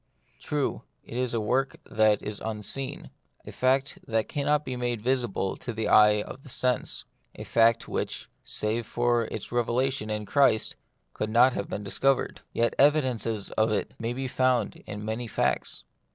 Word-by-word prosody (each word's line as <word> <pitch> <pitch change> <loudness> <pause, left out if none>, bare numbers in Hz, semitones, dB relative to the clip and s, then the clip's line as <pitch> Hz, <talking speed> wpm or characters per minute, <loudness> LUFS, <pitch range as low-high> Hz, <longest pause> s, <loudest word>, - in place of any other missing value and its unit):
True, 145 -2 -2 0.2
it - - -10
is 125 -1 0
a - - +1
work 130 +5 0
that 110 -1 +2
is 105 0 -4
unseen, 110 +5 -4 0.3
a - - -8
fact 135 +2 +1
that 110 -1 0
cannot 150 +1 0
be 130 - -3
made 120 -2 -1
visible 120 -5 0
to 125 - -5
the 110 -1 -2
eye 105 -1 +6
of 135 +2 -10
sense, 125 0 0 0.3
a - - -7
fact 115 0 +3
which, - - -3 0.2
save 110 +2 -1
for 120 -1 +1
its - - -6
revelation 120 0 0
in 105 0 -2
Christ, 135 -2 +3 0.4
could 105 - -3
not 120 +3 +5
have 100 - -4
been 105 - -4
discovered. 135 +7 +1
Yet 115 0 +1
evidences 130 -8 +2
of 110 0 +2
it 105 - -1
may 115 +1 -2
be 130 +1 -3
found 125 -3 +1
in 105 0 -6
many 110 +2 -3
facts. - - -1
120 Hz, 165 wpm, -27 LUFS, 110-130 Hz, 0.4 s, eye